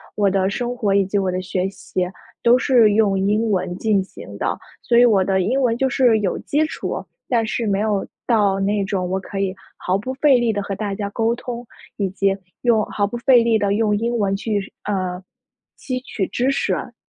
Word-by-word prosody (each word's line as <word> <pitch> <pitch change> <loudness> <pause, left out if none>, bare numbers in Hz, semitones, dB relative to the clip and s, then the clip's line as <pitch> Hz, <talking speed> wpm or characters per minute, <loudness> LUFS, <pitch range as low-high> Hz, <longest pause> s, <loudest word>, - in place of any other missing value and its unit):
我 205 -2 +3
的 190 0 +1
生 245 +3 -3
活 210 -5 0
以 200 -1 +3
及 200 +2 -1
我 190 -2 +1
的 185 +1 -2
学 185 0 -2
习 185 -1 -3 0.4
都 240 +1 +6
是 240 -6 +4
用 205 -3 +3
英 210 +3 +1
文 180 -1 -1
进 205 -3 +1
行 - - -11
的， - - -1 0.2
所 235 - +2
以 245 - +7
我 200 -5 +4
的 190 0 +1
英 255 +9 +1
文 235 -2 +2
就 265 0 +1
是 240 -4 +3
有 195 -3 -1
基 305 +2 0
础， - - -4 0.3
但 230 -3 +2
是 230 +1 -2
没 200 0 +1
有 210 -2 0 0.2
到 205 -5 +3
那 200 +1 +1
种 190 -2 -2
我 190 - 0
可 195 0 -6
以 195 -1 -1 0.2
毫 185 +1 0
不 255 +6 -4
费 275 -2 +4
力 240 -2 +1
地 205 - -1
和 200 -1 -4
大 200 0 -3
家 200 -1 -3
沟 225 +1 +1
通， 240 0 -6 0.3
以 195 -2 0
及 195 +1 0 0.2
用 230 -3 +3
毫 205 -1 -1
不 240 - -5
费 250 -3 +5
力 230 -1 +3
地 200 -1 +1
用 210 -1 +2
英 235 +2 -1
文 195 -2 +1
去， 205 -1 -3
呃， 185 -2 -2 0.5
吸 255 -1 -3
取 205 -6 -3
知 260 +3 0
识。 260 -2 -2
210 Hz, 230 characters per minute, -21 LUFS, 195-235 Hz, 0.5 s, 以